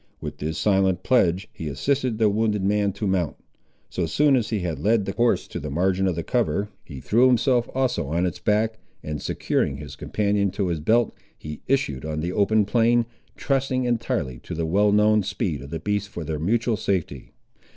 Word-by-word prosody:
With -, -, -7 dB
this 80 Hz, +1 st, -3 dB
silent 95 Hz, -1 st, +2 dB
pledge, 95 Hz, -6 st, +2 dB
he 80 Hz, -, -6 dB
assisted 125 Hz, -, -1 dB
the 110 Hz, -1 st, +3 dB
wounded 105 Hz, -1 st, +1 dB
man 100 Hz, 0 st, +2 dB
to 105 Hz, -, -4 dB
mount. 95 Hz, -4 st, 0 dB, 0.5 s
So 85 Hz, -2 st, -2 dB
soon 140 Hz, -, +3 dB
as 120 Hz, -4 st, 0 dB
he 110 Hz, -4 st, -1 dB
had 85 Hz, -5 st, -3 dB
led 105 Hz, +5 st, +2 dB
the 95 Hz, -, -2 dB
horse 120 Hz, +3 st, +1 dB
to -, -, -5 dB
the 75 Hz, -, -5 dB
margin 95 Hz, +5 st, +1 dB
of 90 Hz, -, 0 dB
the 85 Hz, -, -3 dB
cover, 105 Hz, -3 st, 0 dB
he 70 Hz, -, -9 dB
threw 120 Hz, -, +3 dB
himself 125 Hz, -1 st, +2 dB
also 130 Hz, -, 0 dB
on 85 Hz, +5 st, 0 dB
its 90 Hz, -, -3 dB
back, 110 Hz, +1 st, +1 dB, 0.2 s
and 75 Hz, -1 st, -4 dB
securing -, -, -1 dB
his -, -, -9 dB
companion 100 Hz, -1 st, 0 dB
to 95 Hz, -3 st, -1 dB
his 85 Hz, -2 st, -1 dB
belt, 115 Hz, +10 st, +2 dB, 0.2 s
he 75 Hz, 0 st, -8 dB
issued 125 Hz, -, 0 dB
on 75 Hz, 0 st, -3 dB
the 85 Hz, +3 st, -2 dB
open 105 Hz, +1 st, +3 dB
plain, 120 Hz, +2 st, +3 dB, 0.3 s
trusting 130 Hz, -2 st, 0 dB
entirely 115 Hz, -, -1 dB
to -, -, -7 dB
the 80 Hz, 0 st, -1 dB
well 100 Hz, +5 st, +3 dB
known 105 Hz, +1 st, +4 dB
speed 95 Hz, -7 st, -2 dB
of 70 Hz, -, -9 dB
the 80 Hz, -, -4 dB
beast 105 Hz, -1 st, -2 dB
for 85 Hz, -, -6 dB
their 75 Hz, -1 st, -3 dB
mutual 115 Hz, +6 st, +1 dB
safety. 85 Hz, -11 st, -3 dB
100 Hz, 200 wpm, -24 LUFS, 85-115 Hz, 0.5 s, known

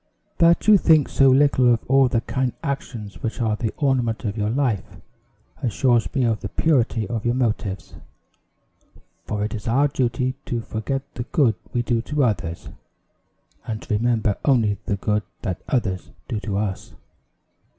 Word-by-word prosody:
"That 170 Hz, +3 st, +4 dB
you 210 Hz, -2 st, +8 dB
think 155 Hz, -5 st, +4 dB
so 135 Hz, -1 st, +4 dB
little 130 Hz, -2 st, +4 dB
of 115 Hz, -, +1 dB
all 135 Hz, 0 st, +5 dB
the 120 Hz, -2 st, 0 dB
kind 130 Hz, -1 st, -1 dB
actions 120 Hz, -8 st, -5 dB
which 115 Hz, -, -3 dB
are 110 Hz, -3 st, +1 dB
the 110 Hz, 0 st, -2 dB
ornament 125 Hz, -6 st, 0 dB
of 105 Hz, -1 st, -2 dB
your 105 Hz, -1 st, -1 dB
life, 120 Hz, -5 st, -1 dB, 0.7 s
assures 120 Hz, 0 st, +1 dB
me 135 Hz, -, +2 dB
of 115 Hz, -2 st, +1 dB
the -, -, -5 dB
purity 120 Hz, -8 st, +1 dB
of 115 Hz, -2 st, -3 dB
your 120 Hz, +1 st, +1 dB
motives; 105 Hz, -6 st, -2 dB, 1.3 s
for 105 Hz, -1 st, -2 dB
it 105 Hz, -, -4 dB
is 110 Hz, 0 st, -6 dB
our 135 Hz, +5 st, +3 dB
duty 130 Hz, -1 st, -1 dB
to 120 Hz, -1 st, -2 dB
forget 130 Hz, +5 st, -3 dB
the 120 Hz, -, -5 dB
good 135 Hz, -8 st, +2 dB, 0.2 s
we 120 Hz, -, 0 dB
do 120 Hz, -1 st, 0 dB
to 145 Hz, +3 st, -1 dB
others, 95 Hz, -8 st, -2 dB, 1.0 s
and 110 Hz, -1 st, -4 dB
to -, -, -3 dB
remember 110 Hz, -2 st, +1 dB
only 110 Hz, -8 st, +2 dB
the 105 Hz, -, +1 dB
good 105 Hz, +2 st, 0 dB, 0.2 s
that 95 Hz, -5 st, -3 dB
others 95 Hz, -, -1 dB, 0.2 s
do 110 Hz, -, -2 dB
to 105 Hz, -2 st, -3 dB
us. 100 Hz, -2 st, -4 dB
115 Hz, 165 wpm, -22 LUFS, 105-130 Hz, 1.3 s, you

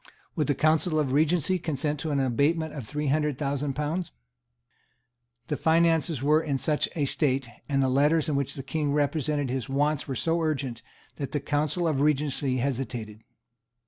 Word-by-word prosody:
Would 155 Hz, -5 st, 0 dB
the 145 Hz, -, +1 dB
Council 155 Hz, +1 st, +2 dB
of 145 Hz, -4 st, +1 dB
Regency 160 Hz, +5 st, +2 dB
consent 150 Hz, -2 st, -2 dB
to 160 Hz, -, -3 dB
an 145 Hz, -2 st, +1 dB
abatement 145 Hz, +5 st, +1 dB
of 135 Hz, -7 st, -6 dB
three 150 Hz, +3 st, -3 dB
hundred 150 Hz, -1 st, +1 dB
thousand 140 Hz, 0 st, -1 dB
pounds? 155 Hz, +4 st, -2 dB, 1.4 s
The 150 Hz, -, -2 dB
finances 160 Hz, -3 st, +2 dB
were 150 Hz, +2 st, +4 dB
in 145 Hz, -4 st, -1 dB
such 150 Hz, +2 st, 0 dB
a 150 Hz, -4 st, +1 dB
state, 135 Hz, -2 st, +1 dB, 0.2 s
and 135 Hz, -1 st, +2 dB
the -, -, +2 dB
letters 145 Hz, +4 st, +3 dB
in 150 Hz, -, 0 dB
which 140 Hz, -2 st, -1 dB
the 135 Hz, -, -6 dB
King 145 Hz, +1 st, -1 dB
represented 145 Hz, -2 st, 0 dB
his 130 Hz, -2 st, -3 dB
wants 145 Hz, +2 st, 0 dB
were 135 Hz, -, -3 dB
so 165 Hz, +6 st, 0 dB
urgent, 135 Hz, -7 st, -2 dB, 0.4 s
that 140 Hz, -, -5 dB
the 145 Hz, -, +1 dB
Council 150 Hz, +4 st, 0 dB
of 145 Hz, -4 st, +1 dB
Regency 145 Hz, -2 st, +1 dB
hesitated. 120 Hz, -4 st, -3 dB
145 Hz, 175 wpm, -27 LUFS, 135-155 Hz, 1.4 s, were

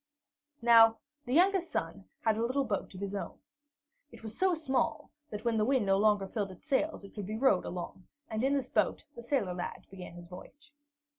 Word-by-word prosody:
Now 225 Hz, -1 st, +7 dB, 0.3 s
the 250 Hz, -, -1 dB
youngest 370 Hz, +1 st, +4 dB
son 95 Hz, -13 st, -3 dB, 0.2 s
had 220 Hz, -1 st, +2 dB
a 220 Hz, -, -2 dB
little 260 Hz, +4 st, +1 dB
boat 205 Hz, -5 st, -2 dB
of -, -, -8 dB
his 200 Hz, 0 st, -3 dB
own. 200 Hz, -, -5 dB, 0.7 s
It 230 Hz, -2 st, -14 dB
was 220 Hz, 0 st, -6 dB
so 375 Hz, -2 st, +2 dB
small 285 Hz, -5 st, -1 dB, 0.2 s
that, 210 Hz, +2 st, -7 dB
when 230 Hz, -1 st, +2 dB
the 215 Hz, -, +3 dB
wind 255 Hz, -1 st, +2 dB
no 195 Hz, 0 st, +3 dB
longer 205 Hz, -2 st, +3 dB
filled 200 Hz, 0 st, -3 dB
its 185 Hz, -, -13 dB
sails, 300 Hz, -3 st, 0 dB
it 200 Hz, -, -12 dB
could 205 Hz, -3 st, -6 dB
be 215 Hz, +1 st, -3 dB
rowed 230 Hz, -7 st, +3 dB
along, 180 Hz, +1 st, -6 dB, 0.2 s
and 220 Hz, +1 st, -3 dB
in 275 Hz, +2 st, +3 dB
this 265 Hz, -2 st, -2 dB
boat -, -, +1 dB
the 235 Hz, -, -8 dB
sailor 235 Hz, -7 st, 0 dB
lad 180 Hz, 0 st, -5 dB
began 185 Hz, -3 st, -9 dB
his 175 Hz, 0 st, -10 dB
voyage. 285 Hz, -, -13 dB
220 Hz, 210 wpm, -31 LUFS, 195-265 Hz, 0.7 s, Now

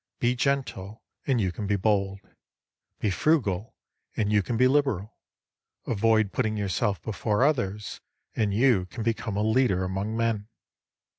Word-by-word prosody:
Be 120 Hz, +1 st, +1 dB
gentle 120 Hz, -7 st, -2 dB, 0.2 s
and 130 Hz, -4 st, +2 dB
you 95 Hz, -4 st, +1 dB
can 100 Hz, +3 st, -5 dB
be 100 Hz, -, +2 dB
bold; 100 Hz, -1 st, 0 dB, 0.8 s
be 105 Hz, -, 0 dB
frugal, 105 Hz, -, 0 dB, 0.4 s
and 105 Hz, -1 st, +1 dB
you 105 Hz, -, +4 dB
can 115 Hz, +4 st, -3 dB
be 130 Hz, +2 st, +5 dB
liberal; 130 Hz, -7 st, 0 dB, 0.7 s
avoid 110 Hz, -2 st, +2 dB
putting 110 Hz, 0 st, -1 dB
yourself 100 Hz, 0 st, 0 dB
before 110 Hz, +2 st, 0 dB
others, 105 Hz, -8 st, -1 dB, 0.3 s
and 110 Hz, -3 st, +1 dB
you 105 Hz, -4 st, +3 dB
can 110 Hz, -, -6 dB
become 110 Hz, -2 st, -2 dB
a 105 Hz, -, +1 dB
leader 110 Hz, -4 st, +2 dB
among 95 Hz, +4 st, -3 dB
men. 115 Hz, -3 st, 0 dB
110 Hz, 145 wpm, -26 LUFS, 100-120 Hz, 0.8 s, be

